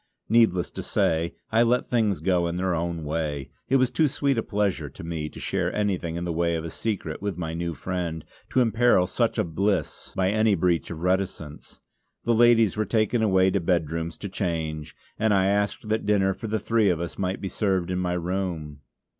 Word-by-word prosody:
Needless 110 -6 +3
to - - -5
say, 80 +1 0 0.2
I 110 +1 +4
let 120 +1 +2
things 110 -9 +1
go 90 0 +2
in 85 +1 -3
their 95 0 0
own 85 -1 -2
way; 75 -3 -3 0.2
it 135 - +3
was 130 -2 +3
too 160 - +3
sweet 140 0 0
a 115 - +1
pleasure 100 -9 -1
to - - -11
me 80 -2 -4
to - - -11
share - - -1
anything 95 -5 -1
in 85 +1 -3
the 85 - -2
way 85 0 +1
of 80 0 -3
a 85 - -5
secret 95 -7 -3
with 100 -4 -3
my 80 -2 -3
new 85 0 -3
friend, 85 -4 -4 0.2
to 130 - +3
imperil 115 -4 +4
such - - 0
a - - +2
bliss 90 0 -1
by 95 0 +2
any 110 -1 +3
breach 85 -1 +1
of 80 -2 -6
reticence. 90 -5 -2 0.4
The 120 - +2
ladies 115 -2 +5
were 110 - +1
taken 110 +2 +1
away 95 -3 +4
to 100 - +1
bedrooms 85 -1 -1
to 100 - -5
change, 80 -5 -3 0.2
and 110 -2 +3
I 95 -1 +3
asked 100 +2 0
that 110 -1 -1
dinner 95 -2 +3
for 110 - -7
the 110 +1 0
three 110 0 +2
of 85 -3 +1
us 85 0 -5
might 95 0 -1
be 95 - -4
served 95 -3 0
in 90 - -1
my 90 -1 0
room. 85 -5 -3
95 Hz, 210 wpm, -25 LUFS, 85-105 Hz, 0.4 s, ladies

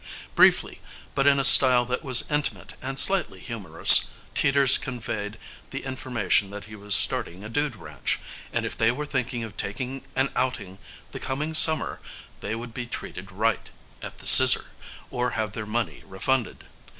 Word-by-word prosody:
Briefly, - - 0 0.3
but 135 0 -2
in 140 0 +2
a 135 - -2
style 130 -2 +7
that 125 +5 -6
was 130 -4 +2
intimate 150 -1 -5
and 135 +1 -8
slightly 180 - +2
humorous, 95 -7 +4 0.2
Teeters 140 -1 +2
conveyed 115 -4 -8 0.3
the - - -9
information 120 -7 -3
that 100 +1 -11
he 110 0 -14
was 105 -1 +2
starting 90 0 +3
a 105 - -10
dude 145 +1 -4
ranch, 85 - -6 0.3
and - - -4
if - - -7
they 115 - -1
were 150 +5 -7
thinking 125 -4 -5
of 110 -2 -11
taking 130 +6 -7
an 135 +1 -2
outing 110 -7 -5 0.3
the - - -9
coming 150 +4 -6
summer 155 0 +4 0.4
they 105 +2 -7
would 115 0 -11
be 120 0 -8
treated - - -10
right - - -4 0.3
at - - -11
the - - -13
"Scissor" - - +7 0.4
or 125 0 -4
have 110 -2 -5
their 110 -2 -9
money 115 +2 -5
refunded. 115 +6 -4
120 Hz, 165 wpm, -22 LUFS, 105-135 Hz, 0.4 s, style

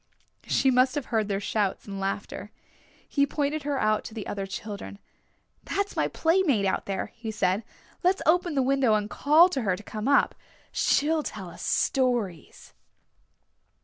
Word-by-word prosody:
She 265 - +3
must 255 +2 +3
have 290 -3 -2
heard 220 -2 +2
their 200 -1 -1
shouts 205 -1 -1
and 195 -1 -6
laughter. 195 +1 -4 0.6
He 280 -1 +2
pointed 295 +1 -1
her 285 -1 -2
out 215 -3 +1
to 220 - -8
the 215 - -5
other 195 -1 -4
children. 200 +1 -7 0.7
"That 400 +1 0
is 405 - -14
my - - +1
playmate 320 - +2
out 190 - -1
there," 195 -1 -3
he 230 -1 -7
said. 205 -1 0 0.4
"Let's 370 +2 +2
open 345 0 +2
the 270 - +3
window 265 -4 +3
and 210 0 -2
call 310 +5 +6
to 275 -7 -2
her 190 -5 +1
to 205 - -11
come 215 +3 -5
up. 280 - +4 0.4
She'll 310 +2 +2
tell 195 -10 -7
us - - -11
stories." 240 - -1
235 Hz, 170 wpm, -27 LUFS, 205-290 Hz, 0.7 s, call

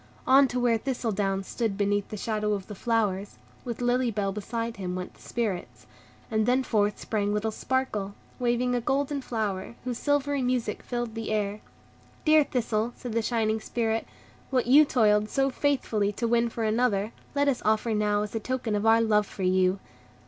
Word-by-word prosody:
On 270 +1 +6
to 250 0 -2
where 235 -2 +2
Thistledown 205 -7 -1
stood 215 0 -2
beneath 205 0 +1
the 215 - -5
shadow 210 0 -1
of 195 -2 -3
the 210 - -8
flowers, 205 -2 -1 0.3
with 240 -1 -5
Lily 245 0 +2
Bell 200 -3 -1
beside 230 +3 -4
him, 180 -2 -3
went 180 0 -5
the - - -21
Spirits; 210 -7 -4 0.5
and 220 0 +1
then 255 +2 +3
forth 210 -4 +1
sprang 205 -2 -1
little 210 +1 0
Sparkle, 215 -5 -2 0.2
waving 245 0 +1
a 245 - +1
golden 280 +3 0
flower, 215 -4 -3
whose 245 -1 -3
silvery 285 -1 +1
music 250 -4 -1
filled 240 -2 -3
the 225 -1 -4
air. 210 -1 -1 0.6
"Dear 310 -1 +6
Thistle," 235 -3 -1
said 245 - -7
the 230 - +1
shining 220 -1 0
Spirit, 225 -1 -1 0.4
"what 255 -3 +1
you 285 +5 +7
toiled 215 -5 +3
so 270 0 +1
faithfully 245 -8 0
to 235 +3 -1
win 235 0 +2
for 230 0 -4
another, 215 -2 +1 0.2
let 285 0 +2
us 270 -3 +1
offer 220 +1 +1
now 210 -1 +1
as 210 - -6
a 225 - -1
token 250 -1 -2
of 210 +1 0
our 225 +1 +6
love 210 -2 +3
for 195 - -6
you." 185 +1 +3
225 Hz, 185 wpm, -27 LUFS, 210-245 Hz, 0.6 s, you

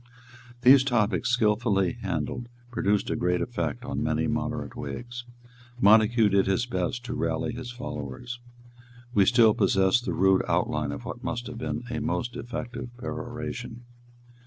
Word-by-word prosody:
These 130 +1 +8
topics, 120 -3 +1
skilfully 105 -5 +2
handled, 120 -1 -3 0.2
produced 105 -4 +1
a - - 0
great 90 0 +1
effect 85 -7 -3
on - - -3
many - - 0
moderate - - -2
Whigs. 120 0 -6 0.5
Montague 110 0 +5
did 100 -1 +3
his 95 +5 +1
best 120 +2 -2
to 125 - -4
rally 80 +8 -1
his 125 0 -6
followers. 120 - -6 0.7
We 100 -4 +4
still 115 -3 +6
possess 95 +3 +3
the 120 - -3
rude 95 0 +4
outline 75 -1 0
of 70 - -7
what - - -7
must 120 0 -3
have 120 -2 -7
been 120 - -3
a 115 - -2
most 120 +1 -2
effective 120 0 -5
peroration. 120 -1 -6
115 Hz, 145 wpm, -27 LUFS, 95-120 Hz, 0.7 s, These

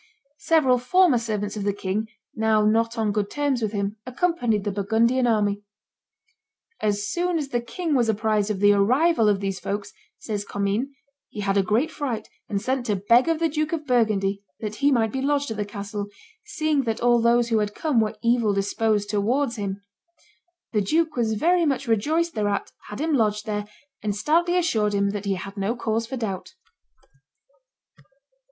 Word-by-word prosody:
Several 270 -7 +3
former 305 +1 +4
servants 210 -2 -3
of 210 - -4
the 205 0 0
king, 205 +2 -2 0.3
now 220 -1 +2
not 230 +2 +2
on 220 -2 +1
good 205 -1 -1
terms 285 -4 -1
with 215 -2 -1
him, 200 0 -2
accompanied 250 - 0
the 205 - -1
Burgundian 225 +5 +2
army. 205 -3 +1 1.2
"As 205 -1 0
soon 350 +7 0
as 290 -4 -3
the 240 -3 -1
king 310 +8 -3
was 240 -4 +2
apprised 215 -1 +1
of 200 -2 -2
the 205 0 +6
arrival 235 +4 +3
of 200 -1 +1
these 195 -1 -2
folks," 200 +1 -4 0.2
says 210 -2 -4
Commynes, 200 +5 -1 0.4
"he 210 - -6
had 200 -1 0
a 200 - +4
great 220 +10 +1
fright, 240 -7 -4 0.2
and 200 -2 -1
sent 255 +3 -2
to 210 - +1
beg 230 - +3
of 330 - +2
the 330 +1 +1
Duke 310 +1 -2
of 310 -2 -3
Burgundy 210 -6 +1 0.2
that 215 -1 -5
he 285 +1 +3
might 225 -4 +2
be 265 - -3
lodged 285 -2 0
at 220 - -4
the 210 - -1
castle, 205 0 -5 0.4
seeing 310 -2 0
that 225 -1 -1
all 240 -1 +3
those 235 0 +3
who 225 -2 +2
had 210 -1 -2
come 300 -7 +1
were 215 -1 0
evil 235 -3 +2
disposed 205 +1 0
towards 230 +5 0
him. 200 -1 -4 0.9
The 210 - +2
duke 315 +9 +1
was 230 -3 0
very 345 +11 +2
much 275 -1 -1
rejoiced 310 +10 +1
thereat, 205 -2 -1 0.2
had 210 - -7
him 315 +1 0
lodged 210 -5 +1
there, 210 -1 -3 0.3
and 205 -2 -2
stoutly 335 +10 +2
assured 220 -12 +1
him 200 0 +1
that 205 0 -5
he 195 -1 0
had 195 +2 -8
no 200 +4 -1
cause 225 -1 -2
for 260 +2 -5
doubt." 220 - -5
220 Hz, 185 wpm, -24 LUFS, 205-265 Hz, 1.2 s, the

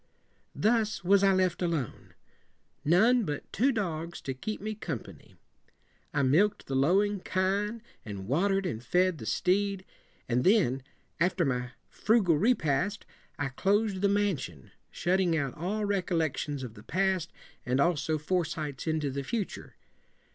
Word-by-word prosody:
Thus 215 -3 +1
was 195 +2 +5
I 195 - +6
left 185 -2 +1
alone. 165 -8 -3 0.7
None 225 +10 +4
but 150 -6 -5
two 260 +7 +3
dogs 170 -7 -3
to 135 - -3
keep 215 +12 -5
me 215 +2 -4
com 175 - -4
pa - - -12
ny. - - -19 0.8
I 140 - +1
milk 195 +11 +3
ed - - -22
the 135 - -5
lowing 195 +9 +3
kine 200 +5 -1 0.2
and 100 -4 -7
water 190 - +2
ed 195 - -2
and 120 -10 -3
fed 180 +5 +2
the 110 - -7
steed, 195 +1 +1 0.4
and 125 +1 +1
then, 180 - +3 0.4
after 175 0 +2
my 125 -2 -2
fru 225 0 +2
gal 175 -3 +3
repast, 185 - +1 0.3
I 145 -1 -1
clos 205 +9 +1
ed 185 - -5
the 200 - +3
man 200 -5 +1
si 85 - -6
on, 65 -4 -18 0.2
shutting 175 -1 +1
out 140 -4 -1
all 205 +6 -2
re 200 -1 +1
collections 155 -5 -2
of 120 -4 -7
the 105 - -13
past 185 - 0 0.3
and 130 +1 0
also 155 0 +2
foresights 155 -3 -2
into 155 -3 0
the 140 +1 -3
future. 210 - -4
180 Hz, 165 wpm, -29 LUFS, 145-200 Hz, 0.8 s, I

